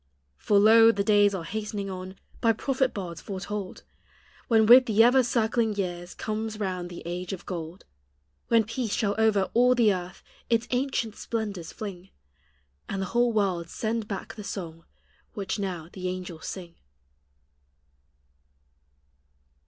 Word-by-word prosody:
For 205 - +2
lo! 225 +2 +7
the 200 -3 -1
days 205 -1 +4
are 175 - -4
hastening 210 +2 -4
on, 185 0 -7 0.3
By 230 -1 +4
prophet 265 +3 0
bards 175 -4 -6
foretold, 195 0 -6 0.6
When 220 -2 +4
with 250 +3 +8
the 220 0 +5
ever 250 +3 +6
circling 230 -2 +1
years 175 -3 -4
Conies 215 0 -4
round 185 -3 -3
the 175 - -9
age 175 +2 -4
of 185 - -8
gold; 170 0 -6 0.6
When 230 -1 +4
Peace 230 0 -3
shall 200 -2 +1
over 210 -3 +2
all 250 +2 +5
the 225 -4 +4
earth 180 -1 -7 0.3
Its 230 0 +1
ancient 250 -4 -1
splendors 205 -7 -4
fling, 190 -3 -8 0.8
And 195 - -3
the 190 - -7
whole 240 0 +3
world 190 -6 0
send 225 -1 -2
back 200 -2 -5
the 210 - -9
song 165 -5 -7 0.5
Which 200 +1 -3
now 180 -5 -4
the 185 -1 -4
angels 180 -3 -6
sing. 175 -3 -7
205 Hz, 145 wpm, -27 LUFS, 185-225 Hz, 0.8 s, with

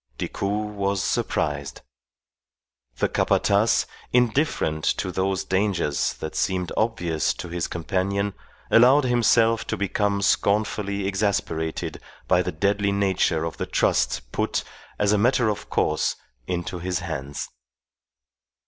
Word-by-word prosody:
Decoud 105 +2 -2
was 100 -1 -1
surprised. 70 -3 -1 1.2
The - - +2
Capataz, - - +2 0.3
indifferent 120 - +1
to 95 - 0
those 95 +1 0
dangers 95 -7 0
that 80 - -7
seemed 90 -2 -1
obvious 90 -9 0
to 90 - -7
his 85 0 -2
companion, 100 +3 -1 0.4
allowed 130 +5 +6
himself 115 -2 +3
to 110 - -2
become 100 0 0
scornfully 100 -1 +1
exasperated 95 -5 -1 0.3
by - - +4
the - - -2
deadly 100 +4 +1
nature 95 -5 +1
of 80 - -4
the - - -3
trust - - 0
put, - - -1 0.3
as 105 -1 +2
a 105 - +3
matter 120 +1 +3
of 105 - -4
course, 75 - +1 0.3
into 90 0 -3
his 90 0 -2
hands. 70 -5 -5
100 Hz, 120 wpm, -24 LUFS, 85-105 Hz, 1.2 s, allowed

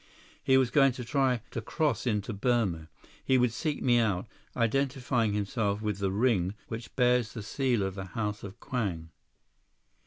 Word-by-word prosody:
He 130 -1 +5
was 130 -3 +2
going 135 -1 +5
to 125 -1 -7
try 130 -2 +1
to 115 - -3
cross 135 -1 -1
into 105 0 -1
Burma. 100 -7 0 0.3
He 130 - +3
would 125 -2 +2
seek 150 +4 -2
me 120 -2 +4
out, 105 -3 0 0.3
identifying 125 -2 +1
himself 105 0 -1
with 105 -2 -2
the 100 -1 0
ring 100 -3 +1
which 115 +1 -7
bears 125 -3 +2
the 110 - -6
seal 125 -1 0
of 95 0 -2
the 95 0 -6
House 105 +2 -3
of 100 +1 -9
Kwang." 90 -10 -3
115 Hz, 165 wpm, -29 LUFS, 100-125 Hz, 0.3 s, He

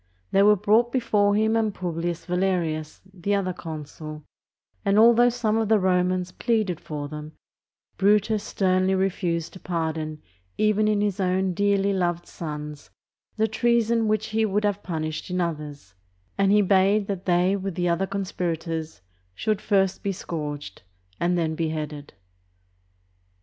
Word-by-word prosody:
They 195 - +4
were 210 +1 +6
brought 215 +4 +3
before 205 -5 +2
him 220 +1 +2
and 220 -2 +1
Publius 170 -1 -3
Valerius, 175 -4 -1
the 195 +2 -1
other 185 -2 -1
consul, 155 -1 -8 0.6
and 200 0 +2
although 235 +2 +6
some 230 -3 0
of 220 -2 0
the 220 - +5
Romans 180 -1 +1
pleaded 215 -5 0
for 145 -2 -5
them, 150 +1 -8 0.6
Brutus 210 +1 +3
sternly 185 0 +1
refused 180 -3 -1
to 185 - -11
pardon 160 -3 -3 0.3
even 215 0 +2
in 210 -1 +2
his 205 -2 -1
own 185 0 +1
dearly 200 +1 +2
loved 175 -2 -1
sons 150 -2 -7 0.5
the 220 0 +2
treason 230 0 +2
which 215 0 0
he 220 +1 +1
would 210 0 +1
have 205 -1 0
punished 155 -3 -4
in 180 0 -1
others, 150 - -4 0.4
and 195 0 +2
he 210 0 +5
bade 195 +2 +3
that 195 -2 -4
they 180 +2 +3
with 195 -2 -4
the 175 0 0
other 175 +3 +1
conspirators 165 - -3 0.3
should 215 - -1
first 195 -2 +1
be 200 - -1
scourged 150 - -6 0.4
and 175 +1 +1
then 160 -2 0
beheaded. 155 -5 -4
185 Hz, 145 wpm, -25 LUFS, 165-205 Hz, 0.6 s, were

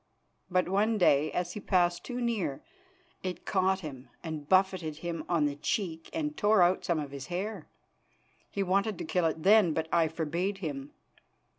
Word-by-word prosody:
But 185 0 +2
one 210 +4 +2
day, 155 -5 +4
as 175 0 -2
he - - -5
passed 175 -3 +1
too 245 -1 -5
near, 220 - -1 0.6
it 185 -1 -5
caught 190 0 +1
him 135 -6 -8
and 155 -3 -6
buffeted 185 -4 +2
him 165 +1 -4
on 165 -4 +2
the 145 -1 -1
cheek 165 +1 -2
and 305 -1 -2
tore 205 -5 +4
out 180 +2 +2
some 170 - 0
of 145 -3 -4
his 140 -1 -7
hair. 190 +5 -4 0.8
He 200 - -1
wanted 195 +2 +1
to - - -5
kill 175 +1 +1
it 160 0 -3
then, 200 -4 +6
but 160 0 -1
I 165 -2 +4
forbade 170 +5 -2
him. 145 -6 -5
175 Hz, 175 wpm, -30 LUFS, 160-195 Hz, 0.8 s, then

